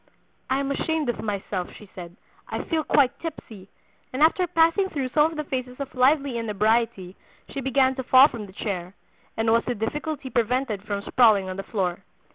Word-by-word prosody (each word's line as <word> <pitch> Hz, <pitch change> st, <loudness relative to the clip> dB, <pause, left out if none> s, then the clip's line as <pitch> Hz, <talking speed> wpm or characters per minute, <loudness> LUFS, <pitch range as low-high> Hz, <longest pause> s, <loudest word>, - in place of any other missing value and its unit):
'I 265 Hz, +1 st, +1 dB
am 280 Hz, 0 st, -2 dB
ashamed 310 Hz, 0 st, -1 dB
of 240 Hz, -, -2 dB
myself,' 200 Hz, -3 st, -4 dB
she 210 Hz, -, -14 dB
said; 175 Hz, -1 st, -9 dB, 0.3 s
'I -, -, -3 dB
feel 320 Hz, -2 st, -1 dB
quite 275 Hz, -2 st, +2 dB
tipsy,' 220 Hz, -, -8 dB, 0.4 s
and 260 Hz, +4 st, +1 dB
after 355 Hz, +3 st, +3 dB
passing 330 Hz, +4 st, +3 dB
through 270 Hz, -6 st, -3 dB
some 300 Hz, +4 st, +3 dB
of 325 Hz, -, -9 dB
the 305 Hz, -, -2 dB
phases 255 Hz, -2 st, -5 dB
of 280 Hz, -1 st, -6 dB
lively 270 Hz, -1 st, +2 dB
inebriety 215 Hz, -3 st, 0 dB, 0.3 s
she 275 Hz, -, -5 dB
began 265 Hz, 0 st, +2 dB
to 260 Hz, -, -4 dB
fall 260 Hz, +2 st, +7 dB
from 225 Hz, -7 st, -8 dB
the 190 Hz, -, -15 dB
chair, 190 Hz, -3 st, -4 dB, 0.4 s
and 225 Hz, 0 st, +1 dB
was 230 Hz, +1 st, +3 dB
with 245 Hz, -, -2 dB
difficulty 285 Hz, +4 st, -4 dB
prevented 235 Hz, -2 st, 0 dB
from 200 Hz, -1 st, -3 dB
sprawling 215 Hz, -6 st, +4 dB
on 185 Hz, -, -5 dB
the -, -, -3 dB
floor. 185 Hz, -4 st, -1 dB
250 Hz, 190 wpm, -24 LUFS, 210-280 Hz, 0.4 s, fall